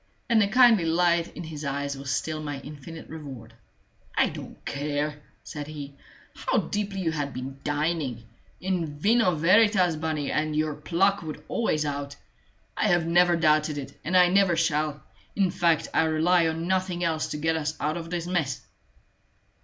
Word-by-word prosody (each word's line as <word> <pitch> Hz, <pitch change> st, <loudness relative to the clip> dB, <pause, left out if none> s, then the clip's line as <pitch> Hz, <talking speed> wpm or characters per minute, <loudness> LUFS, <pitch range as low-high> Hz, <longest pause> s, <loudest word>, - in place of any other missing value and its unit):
And 230 Hz, -3 st, +4 dB
the 200 Hz, -, +3 dB
kindly 230 Hz, -5 st, +5 dB
light 170 Hz, +1 st, +2 dB
in -, -, -5 dB
his 155 Hz, -2 st, -7 dB
eyes 140 Hz, 0 st, -2 dB
was 135 Hz, 0 st, -7 dB
still 155 Hz, +2 st, -2 dB
my 145 Hz, -2 st, -4 dB
infinite 150 Hz, +3 st, -10 dB
reward. 135 Hz, -8 st, -9 dB, 0.6 s
"I -, -, +4 dB
don't -, -, -10 dB
care," 150 Hz, +1 st, -2 dB, 0.2 s
said 145 Hz, -1 st, -7 dB
he, 145 Hz, -2 st, -7 dB, 0.4 s
"how -, -, -1 dB
deeply 200 Hz, -2 st, -2 dB
you 165 Hz, -3 st, 0 dB
had 145 Hz, -4 st, -3 dB
been 135 Hz, +2 st, -6 dB
dining: 145 Hz, -5 st, -1 dB, 0.4 s
in 175 Hz, -6 st, -2 dB
vino 205 Hz, +1 st, +3 dB
veritas, 185 Hz, +1 st, +4 dB
Bunny, 155 Hz, -2 st, -2 dB
and 155 Hz, 0 st, 0 dB
your 155 Hz, 0 st, 0 dB
pluck 185 Hz, +7 st, +1 dB
would 155 Hz, -2 st, -7 dB
always 155 Hz, -9 st, 0 dB
out! 140 Hz, -1 st, -4 dB, 0.6 s
I -, -, +1 dB
have 175 Hz, -2 st, +3 dB
never 175 Hz, +1 st, +4 dB
doubted 155 Hz, -2 st, +2 dB
it, 140 Hz, -, -7 dB
and 180 Hz, +4 st, +2 dB
I 180 Hz, -1 st, +6 dB
never 190 Hz, -2 st, +4 dB
shall. 155 Hz, -2 st, 0 dB, 0.3 s
In 190 Hz, -3 st, +2 dB
fact, 165 Hz, -3 st, +2 dB
I -, -, +3 dB
rely 165 Hz, +2 st, +3 dB
on 165 Hz, +1 st, -2 dB
nothing 185 Hz, -1 st, 0 dB
else 160 Hz, -2 st, 0 dB
to 150 Hz, -, -4 dB
get 160 Hz, +2 st, 0 dB
us 155 Hz, 0 st, -2 dB
out 150 Hz, +2 st, -1 dB
of 165 Hz, -1 st, -6 dB
this 175 Hz, -1 st, -3 dB
mess." 165 Hz, -8 st, -1 dB
160 Hz, 170 wpm, -26 LUFS, 150-175 Hz, 0.6 s, I